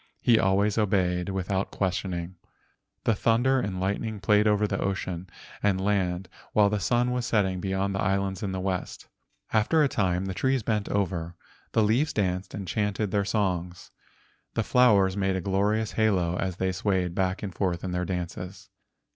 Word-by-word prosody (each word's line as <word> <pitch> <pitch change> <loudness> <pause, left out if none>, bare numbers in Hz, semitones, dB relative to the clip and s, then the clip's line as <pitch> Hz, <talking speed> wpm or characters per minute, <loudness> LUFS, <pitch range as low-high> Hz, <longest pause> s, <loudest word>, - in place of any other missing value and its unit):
He 115 -2 +4
always 100 +3 +2
obeyed 90 -3 +1
with¬ 95 -1 -3
out 95 0 0
questioning. 90 -2 -2 0.7
The 115 - +3
thunder 120 +5 +2
and 95 -6 -3
lightning 100 +3 -2
played 105 +1 +3
over 105 0 +3 0.2
ocean 95 -2 -3 0.3
and 100 -2 +2
land 95 -2 0 0.3
while 105 -1 +4
the 105 - 0
sun 120 +6 +1
was 125 -1 -1
setting 95 -4 +1
beyond 95 +1 -1
the 95 - -1
islands 95 0 0
in 100 -3 -2
the 95 - -3
west. 95 -1 -3 0.5
After 115 +9 +3
a - - +4
time 95 -6 0
the 95 - -3
trees 130 +4 0
bent 105 -1 -1
over, 90 -4 -1 0.4
the 110 - +4
leaves 120 +9 +2
danced 95 -2 -1
and 100 -2 -6
chanted 105 0 -1
their 100 -1 +2
songs. 90 -4 -2 0.6
The 115 - +1
flowers 105 -7 +4
made 95 -1 0
a - - 0
glorious 105 +4 0
halo 95 -6 +1
as 95 0 -2
they 95 +1 0
swayed 95 -3 0
back 95 +1 -1
and 95 -3 -4
forth 90 -1 -1
in 95 - -3
their 90 0 -1
dances. 90 +1 -5
95 Hz, 170 wpm, -27 LUFS, 95-105 Hz, 0.7 s, He